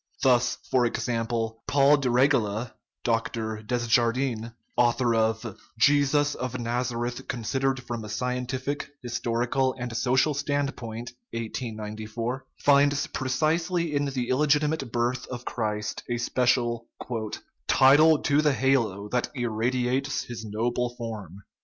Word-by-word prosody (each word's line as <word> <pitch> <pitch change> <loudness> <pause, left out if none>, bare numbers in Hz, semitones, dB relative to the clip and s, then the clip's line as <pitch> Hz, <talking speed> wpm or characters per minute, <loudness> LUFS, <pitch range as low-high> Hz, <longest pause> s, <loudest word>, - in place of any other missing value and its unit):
Thus, 125 -2 +4 0.2
for 130 -1 +4
example, 115 -1 -2
Paul 140 +1 +5
de 135 -3 0
Regla 120 -3 +2 0.3
(Dr. 115 -1 -1
Desjardin), 120 +1 +1 0.2
author 120 0 +3
of 110 -1 0 0.2
Jesus 145 +3 +4
of 125 0 -4
Nazareth 120 0 -2
considered 130 +2 -1
from 120 -2 -5
a 105 - -8
Scientific, 125 +5 -2
Historical, 120 +2 0
and 120 -2 -5
Social 130 +5 +2
Standpoint 135 -5 -3 0.2
(1894), 115 +1 -4 0.2
finds 145 0 +4
precisely 160 +5 0
in 145 0 +1
the 130 -3 -2
illegiti 150 +2 +3
mate 145 -6 -3
birth 120 +1 -1
of 125 -1 -7
Christ 105 -2 -2
a 120 - 0
special 120 -1 +1 0.4
* - - -7 0.2
title 150 +4 +6
to 145 0 +3
the 150 -2 +3
halo 115 -7 +1
that 125 +2 0
ir 120 -3 -1
radiates 125 +5 0
his 115 -2 -7
noble 120 +3 -1
form." 105 -5 -7
125 Hz, 120 wpm, -26 LUFS, 115-135 Hz, 0.4 s, title